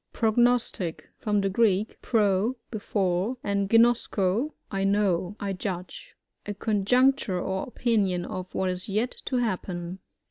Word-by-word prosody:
Prognostic. 230 -6 +1
— - - -46
From 210 -1 +1
the 195 - 0
Greek, 210 0 +1
pro, 210 +1 +2 0.2
before, 205 0 -1
and 200 -1 0
ginosko, 230 0 +3 0.2
I 195 0 -1
know, 195 -2 +1
I. 200 -2 -2
judge. 185 - -6 0.3
A 205 - -3
conjecture 215 0 +2
or 190 +1 -2
opinion 205 -8 0
of 185 -3 -6
what 185 -1 +1
is 180 +3 -4
yet 220 +5 0
to 260 - -2
happen. 185 -6 -2
200 Hz, 135 wpm, -27 LUFS, 185-230 Hz, 0.3 s, ginosko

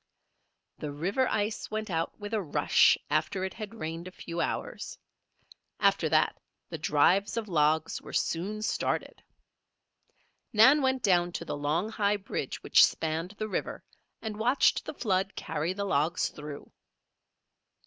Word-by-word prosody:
The 150 - -4
river 190 - 0
ice 210 +1 -2
went 215 -2 -4
out 165 -1 -2
with 205 +1 -7
a 215 - +1
rush 160 -6 +4
after 190 - 0
it 190 - -5
had 215 0 -7
rained 165 -2 -5
a - - -8
few 170 -2 -5
hours; - - -4 0.8
after - - +3
that - - +2 0.3
the - - -5
"drives" 185 +9 +2
of 225 -2 -2
logs 155 -2 +1
were - - -10
soon 205 +6 -1
started. - - -2 1.3
Nan 260 +8 +7
went 260 -1 +1
down 175 -3 +3
to 170 - -4
the - - -3
long, 150 +8 -1
high 205 -1 +1
bridge 200 - -5
which - - +6
spanned 165 +5 0
the 215 - -3
river 210 - -4 0.4
and 215 -1 -5
watched 250 +5 +3
the - - -6
flood 195 -5 0
carry 155 +4 -2
the 200 +2 -3
logs 165 -2 +1
through. 150 -1 -9
190 Hz, 150 wpm, -29 LUFS, 165-215 Hz, 1.3 s, Nan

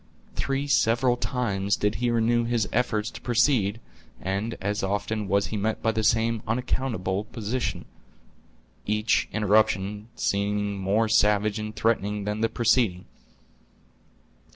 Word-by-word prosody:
Three 135 +1 -1
several 120 -2 +3
times 105 -6 -1
did 105 0 0
he 120 - +2
renew 120 0 +2
his 115 -3 0
efforts 115 -2 0
to - - -10
proceed, 120 -4 +2 0.4
and 100 +5 -3
as 100 +2 -2
often 105 +2 -2
was 100 +1 +2
he - - -1
met 110 +2 -2
by 115 - +3
the 110 0 -2
same 115 +1 +2
unaccountable 115 -5 -1
opposition, 120 +2 -3 1.0
each 105 +1 +1
interruption 105 0 +1
seeming 100 0 -1
more 100 +4 +1
savage 105 0 +2
and 110 0 -5
threatening 105 -2 0
than 105 +1 -3
the 115 - +2
preceding. 110 -6 +1
110 Hz, 130 wpm, -26 LUFS, 100-115 Hz, 1.0 s, several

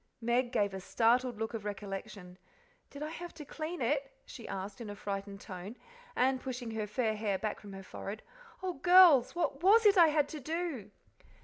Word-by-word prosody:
'" - - -47
Meg 240 +1 +1
gave 200 -2 +1
a 190 - -4
startled 240 +4 +2
look 225 +1 -3
of 225 -3 -4
recollection. 195 -2 -7 0.5
"Did 285 +1 -7
I 305 - -3
have 345 +1 -8
to 305 -2 -9
clean 315 0 -5
it?" 275 +2 0
she 235 - -10
asked 195 +4 -6
in 220 - -6
a 205 - -6
frightened 200 0 -5
tone, 190 +4 -8 0.4
and 260 +1 +2
pushing 250 -3 -5
her 220 -1 -3
fair 220 0 0
hair 210 -2 -1
back 215 +1 -3
from 205 -2 -11
her 195 0 -8
forehead. 200 +3 -7 0.4
"Oh, 370 -1 -1
girls! 345 -5 +6
what 325 -4 -1
WAS 430 +5 +6
it 400 -2 +6
I 335 - +9
had 300 -2 +2
to 310 - -6
do?" 310 - -4
240 Hz, 200 wpm, -32 LUFS, 205-300 Hz, 0.5 s, I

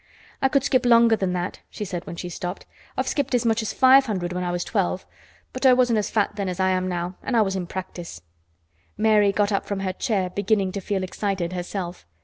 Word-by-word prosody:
"I 270 - +3
could 275 -1 +2
skip 265 -2 +2
longer 235 -2 +6
than 190 -4 -1
that," 180 +1 -3
she 210 - -5
said 180 -2 -5
when - - -6
she 180 - -5
stopped. 175 +1 -5 0.3
"I've - - 0
skipped 280 -3 0
as 240 - +1
much 225 0 +2
as 220 - -3
five 265 +1 +6
hundred 180 -5 -2
when 180 0 -2
I 175 - -1
was 175 0 -1
twelve, 190 -3 -1 0.5
but - - -6
I 260 -1 +7
wasn't 245 -3 +3
as 210 - -2
fat 210 -1 0
then 200 -2 -1
as 180 0 -5
I 190 0 +3
am 185 0 0
now, 180 0 -3
an' 260 - -2
I 225 - +5
was 195 -1 -2
in 180 -2 -3
practice." 175 - -7 0.7
Mary 210 -2 +4
got 205 +1 +1
up 200 - -1
from 200 -1 -3
her 190 -1 -2
chair 190 -2 -1
beginning 200 -1 +1
to 200 - -4
feel 190 0 -2
excited 185 -2 -2
herself. 180 - -5
195 Hz, 235 wpm, -24 LUFS, 180-220 Hz, 0.7 s, I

